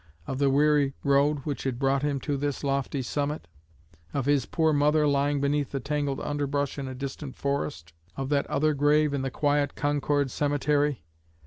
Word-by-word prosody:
Of 130 - -4
the 140 -1 +3
weary 145 0 +3
road 140 +1 +3
which 145 -2 -3
had 130 -3 -2
brought 135 +1 +1
him 145 -1 0
to 145 - -1
this 145 +1 -2
lofty 140 -1 -1
summit? 145 - -2 0.7
Of 140 -3 0
his 145 -3 +2
poor 160 -2 +2
mother 150 +1 +3
lying 145 0 +2
beneath 140 0 0
the 135 - -3
tangled 145 0 -2
underbrush 145 -1 -2
in 135 - -4
a 130 - -6
distant 135 +1 -6
forest? 140 - -3 0.2
Of 135 0 -3
that 145 -1 +1
other 155 +1 +1
grave 145 +1 +3
in 140 - -1
the 135 - -1
quiet 145 +1 0
Concord 145 -1 0
cemetery? 145 - +1
145 Hz, 180 wpm, -27 LUFS, 135-145 Hz, 0.7 s, the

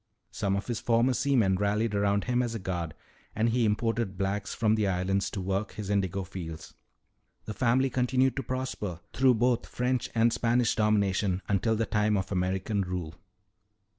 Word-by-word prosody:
Some 100 -1 -1
of 100 - -3
his 120 -3 -3
former 120 +2 +2
seamen 120 -7 +2
rallied 105 +2 0
around 100 0 +1
him 125 0 +1
as 120 -2 -2
a - - -1
guard, 85 -5 -4 0.4
and 110 +2 +2
he 120 0 +2
imported 110 -2 0
blacks 100 0 -2
from 110 -2 +1
the 110 -2 +1
islands 95 +1 0
to 100 - -5
work 95 +2 -2
his 105 -2 -5
indigo 95 -1 0
fields. 85 -3 -8 0.7
"The 110 - -5
family 130 +3 +2
continued 130 +1 +2
to - - 0
prosper 125 -8 -4
through 130 -1 +4
both 120 +1 +1
French 125 0 -1
and 115 0 +3
Spanish 120 0 +2
domination 100 -3 +1
until 105 +3 +1
the 115 +1 0
time 105 -1 +1
of 95 - -3
American 95 +2 0
rule." 90 -4 -4
105 Hz, 170 wpm, -28 LUFS, 95-120 Hz, 0.7 s, through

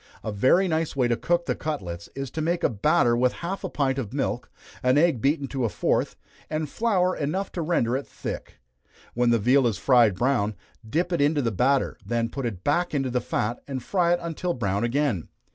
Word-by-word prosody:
A 110 - -3
very 130 - +3
nice 160 -3 -1
way 130 -3 +2
to 120 - +3
cook 170 +8 0
the - - 0
cutlets, 90 - -5
is 135 -2 -5
to 160 - -3
make 170 +2 0
a - - +4
batter 120 +2 +3
with 125 +1 +2
half 195 +3 -4
a 190 - -2
pint 135 -3 0
of 120 0 -5
milk, 125 -4 -2 0.3
an 130 +2 +3
egg 155 -7 +3
beaten 145 +1 +1
to 130 -2 -2
a 115 - +1
froth, - - 0 0.3
and 155 0 -2
flour 185 -1 +1
enough 170 +7 -2
to 175 - -3
render 155 -7 +1
it 140 - -3
thick. - - -6 0.6
When 120 0 +2
the 120 - +4
veal 125 +4 +4
is 110 -5 -1
fried 120 -5 +4
brown, 110 -2 +1 0.3
dip 175 +7 0
it 170 - +1
into 145 0 +2
the 115 - 0
batter, 130 +7 +1
then 115 -1 -1
put 135 0 -3
it 95 -6 -6
back 175 +3 +1
into 135 -2 0
the 125 0 0
fat, 110 +3 -2
and 135 -3 -4
fry 175 -3 +1
it 175 - +1
until 170 +1 -2
brown 100 -4 -1
again. 120 - 0
135 Hz, 215 wpm, -25 LUFS, 120-160 Hz, 0.6 s, a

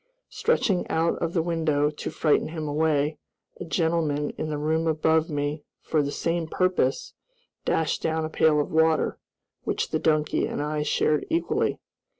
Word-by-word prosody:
Stretching 200 - +1
out 165 +1 +1
of 165 0 -2
the 165 - +2
window 155 -3 +1
to 150 - -5
frighten 150 -2 +1
him 155 -1 -5
away, 150 0 +1 0.4
a - - -5
gentleman 160 -5 0
in 155 - -5
the 150 - -2
room 160 +2 0
above 160 +1 +2
me, 145 0 -2 0.2
for 155 - 0
the 140 - -2
same 165 +1 -1
purpose, 180 -6 0 0.5
dashed 160 - 0
down 160 0 0
a - - -4
pail 155 -1 +3
of 145 - -1
water, 160 -1 +2 0.4
which - - -1
the 155 - +1
donkey 155 -1 +1
and - - -4
I 150 +1 -1
shared 150 0 +1
equally. 335 +1 0
155 Hz, 160 wpm, -26 LUFS, 150-165 Hz, 0.5 s, pail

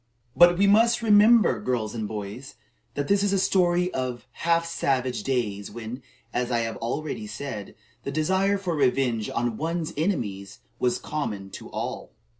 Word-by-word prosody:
But 175 0 +7
we 200 - +4
must 230 +4 +4
remember, 210 - +5
girls 110 -2 -1
and 110 -3 -3
boys, 105 +6 -7 0.4
that 145 0 -2
this 200 0 +3
is 200 -1 +1
a - - +3
story 180 -1 +2
of 125 -2 -3
half 170 +3 +1
savage 130 -7 -1
days 105 -5 -2
when, 120 +3 -7 0.3
as 125 0 -1
I 120 -2 +1
have 115 -1 -3
already 120 -1 -4
said, 110 -2 -6 0.3
the 140 - -5
desire 190 +7 +1
for 185 -4 -2
revenge 125 -5 +1
on 120 -2 -1
one's 165 +1 -2
enemies 105 - -2 0.2
was 125 - +1
common 105 -10 -4
to - - -9
all. - - -5
135 Hz, 160 wpm, -25 LUFS, 115-175 Hz, 0.4 s, But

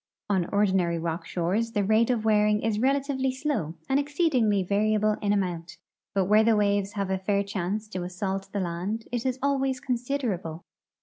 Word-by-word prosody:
On 185 -3 +2
ordinary 190 -4 +2
rock 165 0 -3
shores 200 +7 -1
the 205 -3 +1
rate 220 +4 +3
of 240 -3 +1
AA^earing 210 0 +2
is 215 -2 0
relatively 265 +1 +1
slow 255 - -2
and 270 +1 +2
exceedingly 280 - +2
variable 215 +2 +2
in 205 - +1
amount, 175 -4 -2 0.4
but 195 -1 +2
Avhere 210 +2 +5
the 225 0 +4
waves 200 -1 +1
have 200 -2 -2
a 190 - 0
fair 200 +1 +1
chance 200 +2 -3
to 185 -3 -4
assault 190 +2 -3
the 205 - -2
land 185 +6 -3
it 245 +1 -1
is 255 0 -1
always 270 -2 +1
considerable. 235 - -2
210 Hz, 175 wpm, -27 LUFS, 190-240 Hz, 0.4 s, Avhere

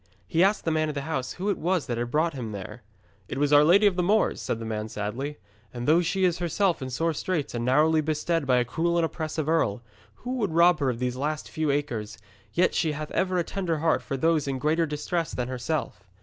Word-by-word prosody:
He 165 +2 +3
asked 200 +2 +2
the 165 - +1
man 155 0 +1
of 150 - -5
the 140 - -2
house 145 -4 -3
who 190 +3 -4
it 195 - -3
was 180 -1 0
that 120 - -2
had 120 0 -2
brought 155 +5 +1
him 120 -6 -5
there. 100 +4 -7 0.5
'It - - -4
was 145 +1 +2
our 145 0 +8
Lady 190 +7 +5
of 200 -3 +4
the 180 - +1
Moors,' 205 +5 +2
said - - -2
the 115 - -6
man 110 -1 -3
sadly. 115 +8 -4 0.4
'And 120 0 -4
though 160 +3 +5
she 185 +2 +1
is 175 -1 +1
herself 175 0 0
in 130 - -4
sore 165 +6 0
straits 160 -1 -2
and 120 -1 -2
narrowly 155 +5 +3
bestead 155 0 -1
by 125 -1 +4
a 125 - +2
cruel 170 +7 0
and 170 - +3
oppressive 155 -2 -3
earl, 120 -9 +1 0.3
who 250 +2 -5
would 205 -9 -1
rob 170 -1 +5
her 140 -3 +1
of 120 - -2
these 125 0 -2
last 150 +3 -3
few 155 -1 -1
acres, 130 -7 -2 0.3
yet - - +2
she 155 -2 +1
hath 150 0 -6
ever 185 -1 0
a 175 - +2
tender 175 -2 -2
heart 160 +1 +1
for 135 - -4
those 160 0 +2
in 135 -1 -1
greater 160 +4 +1
distress 150 +3 -2
than 125 0 -2
herself.' 130 - -3
155 Hz, 245 wpm, -26 LUFS, 130-170 Hz, 0.5 s, our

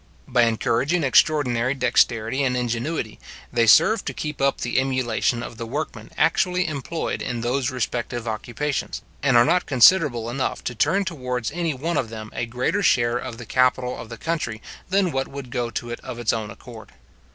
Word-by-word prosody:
By 120 -1 +4
encouraging 120 +8 +1
extraordinary 130 -3 +3
dexterity 120 0 +2
and 125 -2 +1
ingenuity, 120 0 -2 0.3
they 115 -2 +3
serve 215 - +6
to - - -4
keep 150 -2 -5
up 140 0 +1
the - - +1
emulation 125 -3 0
of 115 - -8
the 115 0 -5
workmen 120 -4 -5
actually 180 +2 +2
employed 155 +2 -3
in 120 -2 -3
those 125 +2 0
respective 120 -1 -3
occupations, 120 +6 -3 0.2
and 135 -3 +4
are 120 - +6
not 180 +5 +2
considerable 135 -3 +5
enough 130 +1 -2
to 125 - -3
turn 195 - +1
towards 125 -8 -3
any 165 -2 -2
one 160 +5 -2
of 115 - -1
them 110 -1 -8
a 120 - -3
greater 125 - -1
share 120 -8 +3
of 125 -3 -7
the 125 - -9
capital 130 +1 +1
of 110 - -9
the 115 - -8
country 155 -7 -3 0.3
than 190 -2 +2
what 135 -1 -1
would 135 -3 -8
go 120 -1 -1
to 120 0 -5
it 120 - -5
of 130 -2 -8
its 120 -3 0
own 110 -2 -3
accord. 115 -1 -12
125 Hz, 185 wpm, -23 LUFS, 120-145 Hz, 0.3 s, serve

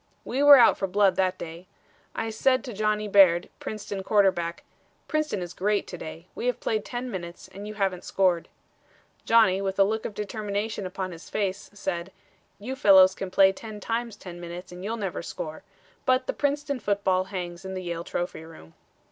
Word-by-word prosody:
We 265 - -1
were 290 -1 +10
out 240 - +6
for 195 - 0
blood 195 0 +3
that 185 -1 +1
day. 170 +2 -8 0.5
I 225 0 -2
said 255 +4 +2
to 250 -4 -7
Johnny 215 +1 0
Baird, 190 -4 +5
Princeton 205 -2 -5
quarterback: 190 -4 +1 0.4
'Princeton 305 - -1
is 175 0 -7
great 205 +2 0
to 180 - -8
day. 160 +2 -8
We 245 - -3
have 250 - 0
played 215 -2 -1
ten 245 0 -5
minutes 175 -3 -7
and 200 +2 -9
you 215 - -7
haven't 195 -3 -1
scored.' 180 -3 +1 0.8
Johnny, 215 -5 +5
with 195 -1 -2
a 195 - +6
look 220 +2 -1
of 205 - -11
determination 210 -1 -3
upon 185 0 -4
his 165 -1 -11
face, 195 -1 -2
said, 190 -2 -3 0.5
'You 250 +6 -5
fellows 190 -6 +7
can 195 - -5
play 190 +1 +5
ten 215 +2 -9
times 230 +1 -3
ten 180 -4 -10
minutes 175 +1 -8
and 180 +1 -9
you'll 225 +3 -3
never 195 -5 -3
score,' 155 -2 -6 0.4
but 255 0 +2
the - - -2
Princeton 285 -1 -1
football 200 -3 +1
hangs 175 -2 -6
in 190 0 -6
the 185 - -4
Yale 170 -1 -4
trophy 175 -2 -4
room. 160 - -14
195 Hz, 190 wpm, -26 LUFS, 180-215 Hz, 0.8 s, were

